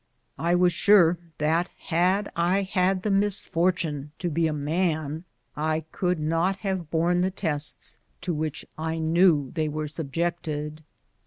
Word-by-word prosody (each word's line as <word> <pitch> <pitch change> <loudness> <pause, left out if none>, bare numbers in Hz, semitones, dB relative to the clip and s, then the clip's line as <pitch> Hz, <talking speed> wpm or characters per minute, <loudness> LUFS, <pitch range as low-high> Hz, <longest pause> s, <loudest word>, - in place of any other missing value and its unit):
I 170 +2 +2
was 180 0 +4
sure 175 -2 +5 0.2
that 160 +4 +1
had 185 +4 +1
I 180 +4 +2
had 185 0 +1
the 210 - 0
misfortune 180 -7 0
to 175 -2 -2
be 165 +1 +2
a - - -1
man 155 +1 -1 0.3
I 155 +1 0
could 180 -2 0
not 165 +5 +1
have 190 -5 -2
borne 170 +2 +2
the 185 - +2
tests 155 -6 -1 0.2
to 180 -1 -2
which 155 0 -3
I 160 +1 -2
knew 160 -3 +3
they 155 -1 0
were 155 0 -3
subjected. 155 0 -3
165 Hz, 145 wpm, -26 LUFS, 155-180 Hz, 0.3 s, sure